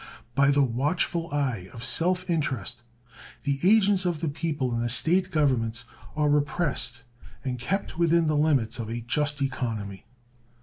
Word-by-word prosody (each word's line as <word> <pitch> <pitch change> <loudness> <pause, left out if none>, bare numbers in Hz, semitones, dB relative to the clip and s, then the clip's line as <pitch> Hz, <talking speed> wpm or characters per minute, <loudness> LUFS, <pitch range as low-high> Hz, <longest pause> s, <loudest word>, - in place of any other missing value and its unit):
By 140 +1 +4
the 140 0 +4
watchful 150 +7 -1
eye 130 -10 -2
of 115 - -8
self 180 +2 +2
interest 140 - -2 0.6
the 140 -1 -1
agents 200 -1 +4
of 175 -4 -1
the 160 - -1
people 145 -4 -2
in 115 - -1
the 120 - -1
State 175 +10 +3
governments 125 -9 0 0.3
are 150 -1 +2
repressed 145 -4 0 0.4
and 125 -2 -3
kept 185 +5 -3
within 170 0 +3
the 155 -1 +1
limits 140 -7 +1
of 110 -1 -4
a 120 +1 -4
just 145 +4 -1
economy. 110 -7 -4
145 Hz, 150 wpm, -26 LUFS, 120-165 Hz, 0.6 s, By